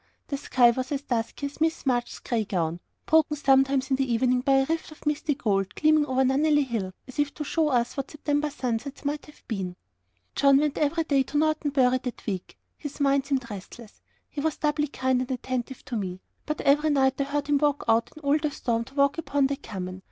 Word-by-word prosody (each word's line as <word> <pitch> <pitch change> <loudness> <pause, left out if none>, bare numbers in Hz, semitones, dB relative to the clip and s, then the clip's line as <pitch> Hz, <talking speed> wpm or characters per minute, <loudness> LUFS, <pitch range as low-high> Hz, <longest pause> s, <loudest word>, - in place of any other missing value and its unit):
The 280 - -1
sky 245 -3 +4
was 255 +3 -4
as 280 -1 -2
dusky 240 +1 -2
as 280 +2 -7
Miss 320 -1 0
March's 245 -2 0
grey 230 -3 -1
gown; 170 -4 -2 0.3
broken 310 -1 +3
sometimes 270 -1 +3
in 265 - +3
the 265 -2 0
evening 250 +2 +2
by 275 +1 +2
a 270 0 +4
rift 325 +2 -2
of 310 - -15
misty 295 0 0
gold, 195 -5 -1
gleaming 310 -1 +3
over 260 0 +2
Nunnely 290 +2 +3
Hill, 220 -7 -3 0.2
as 260 - -10
if 290 -1 +2
to 300 - -4
show 315 +2 +1
us 240 -3 +1
what 275 -2 -4
September 295 0 -1
sunsets 275 0 -4
might 295 +2 -2
have 300 - -17
been. 190 -5 -3 0.6
John 275 -1 +5
went 295 0 0
every 310 +3 +1
day 280 -3 +2
to 275 +2 -2
Norton 310 -1 +1
Bury 255 -2 +3
that 250 -1 -7
week. 190 -4 -4 0.2
His 290 -1 -7
mind 280 -1 +2
seemed 265 -4 -1
restless 205 +3 -10 0.3
he 290 - -5
was 315 0 -1
doubly 300 0 0
kind 260 -2 0
and 255 - -4
attentive 255 0 -4
to 245 - -5
me; 185 -4 -3 0.3
but 305 0 -2
every 295 +2 +3
night 270 -1 +2
I - - +1
heard 285 +1 -2
him 290 -1 +2
go 295 -1 +3
out 225 +1 +3
in 310 - -13
all 285 +2 +3
the 300 0 0
storm 235 -4 -1
to 270 - -16
walk 280 +2 +2
upon 280 -2 +1
the 280 +1 0
common. 185 -7 -7
275 Hz, 220 wpm, -26 LUFS, 245-295 Hz, 0.6 s, John